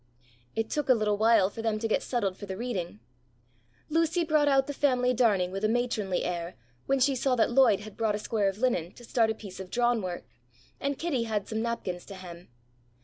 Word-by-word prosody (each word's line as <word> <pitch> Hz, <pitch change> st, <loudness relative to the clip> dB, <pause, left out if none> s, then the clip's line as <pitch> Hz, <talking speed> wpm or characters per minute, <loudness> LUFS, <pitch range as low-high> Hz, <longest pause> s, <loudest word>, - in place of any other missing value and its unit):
It 225 Hz, 0 st, -2 dB
took 295 Hz, -3 st, -1 dB
a 255 Hz, -, +7 dB
little 210 Hz, -2 st, 0 dB
while 220 Hz, -3 st, +4 dB
for 225 Hz, -, -6 dB
them 225 Hz, -1 st, 0 dB
to 225 Hz, +1 st, -2 dB
get 220 Hz, -, +1 dB
settled 205 Hz, -7 st, -1 dB
for 205 Hz, -, -9 dB
the 190 Hz, -1 st, -5 dB
reading. 195 Hz, -, -4 dB, 0.9 s
Lucy 330 Hz, +2 st, +1 dB
brought 305 Hz, -2 st, +2 dB
out 270 Hz, -1 st, +4 dB
the 285 Hz, -, -4 dB
family 250 Hz, -3 st, +2 dB
darning 205 Hz, -7 st, +2 dB
with 195 Hz, +2 st, -5 dB
a -, -, +4 dB
matronly 225 Hz, -6 st, 0 dB
air, 175 Hz, 0 st, -3 dB, 0.3 s
when 275 Hz, 0 st, +2 dB
she 270 Hz, +1 st, +3 dB
saw 260 Hz, 0 st, +1 dB
that 235 Hz, 0 st, +2 dB
Lloyd 240 Hz, -6 st, +5 dB
had 215 Hz, -1 st, -11 dB
brought 220 Hz, -2 st, +1 dB
a -, -, -1 dB
square 210 Hz, -1 st, 0 dB
of 195 Hz, -, -6 dB
linen 210 Hz, -8 st, 0 dB
to 240 Hz, -, -15 dB
start 230 Hz, -1 st, +2 dB
a 220 Hz, -, -1 dB
piece 195 Hz, -4 st, -10 dB
of 190 Hz, -1 st, -7 dB
drawn 240 Hz, +1 st, +1 dB
work, 180 Hz, -2 st, -4 dB, 0.6 s
and 280 Hz, 0 st, -2 dB
Kitty 280 Hz, -9 st, -1 dB
had 215 Hz, -3 st, -2 dB
some 220 Hz, 0 st, -2 dB
napkins 210 Hz, -7 st, -3 dB
to 200 Hz, -, -8 dB
hem. 175 Hz, -2 st, -10 dB
225 Hz, 220 wpm, -28 LUFS, 195-250 Hz, 0.9 s, a